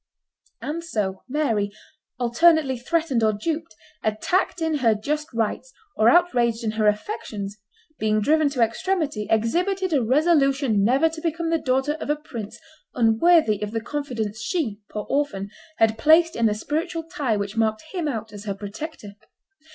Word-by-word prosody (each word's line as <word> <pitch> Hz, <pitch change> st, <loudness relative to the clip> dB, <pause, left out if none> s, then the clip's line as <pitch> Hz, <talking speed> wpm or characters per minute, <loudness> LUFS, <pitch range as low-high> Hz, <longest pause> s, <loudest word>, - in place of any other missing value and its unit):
And 325 Hz, +3 st, -3 dB
so 205 Hz, -, -2 dB
Mary, 230 Hz, -8 st, 0 dB, 0.5 s
alternately 270 Hz, +3 st, +3 dB
threatened 275 Hz, 0 st, 0 dB
or 215 Hz, 0 st, +3 dB
duped, 315 Hz, +4 st, -4 dB, 0.3 s
attacked 345 Hz, -, 0 dB
in 320 Hz, -2 st, 0 dB
her 230 Hz, -4 st, +3 dB
just 300 Hz, +8 st, -3 dB
rights 230 Hz, -, -2 dB, 0.2 s
or 220 Hz, +1 st, +5 dB
outraged 240 Hz, -10 st, +3 dB
in 220 Hz, -, 0 dB
her 215 Hz, -1 st, +1 dB
affections, 210 Hz, -, -3 dB, 0.4 s
being 215 Hz, 0 st, +2 dB
driven 305 Hz, +6 st, +3 dB
to 255 Hz, -4 st, +1 dB
extremity, 280 Hz, -, -1 dB
exhibited 360 Hz, -, +1 dB
a 280 Hz, -, +3 dB
resolution 275 Hz, -4 st, +3 dB
never 265 Hz, +9 st, +4 dB
to 320 Hz, 0 st, -6 dB
become 330 Hz, 0 st, -1 dB
the 330 Hz, -, +2 dB
daughter 265 Hz, +2 st, +1 dB
of -, -, -5 dB
a 295 Hz, -, +3 dB
prince 235 Hz, -8 st, -8 dB, 0.4 s
unworthy 225 Hz, -, +4 dB
of 210 Hz, -, -2 dB
the 225 Hz, +1 st, -2 dB
confidence 225 Hz, -5 st, -4 dB
she, 230 Hz, -, -2 dB
poor 210 Hz, -1 st, -4 dB
orphan, 205 Hz, -9 st, -1 dB, 0.3 s
had 220 Hz, 0 st, +2 dB
placed 325 Hz, +4 st, +5 dB
in 230 Hz, -1 st, +3 dB
the 210 Hz, -, 0 dB
spiritual 325 Hz, -, -3 dB
tie 295 Hz, -10 st, -1 dB
which 200 Hz, +1 st, -4 dB
marked 220 Hz, -1 st, 0 dB
him 350 Hz, -5 st, -2 dB
out 225 Hz, -6 st, -4 dB
as 205 Hz, 0 st, -9 dB
her 200 Hz, -2 st, -3 dB
protector. 205 Hz, +2 st, -7 dB
255 Hz, 160 wpm, -24 LUFS, 215-320 Hz, 0.5 s, or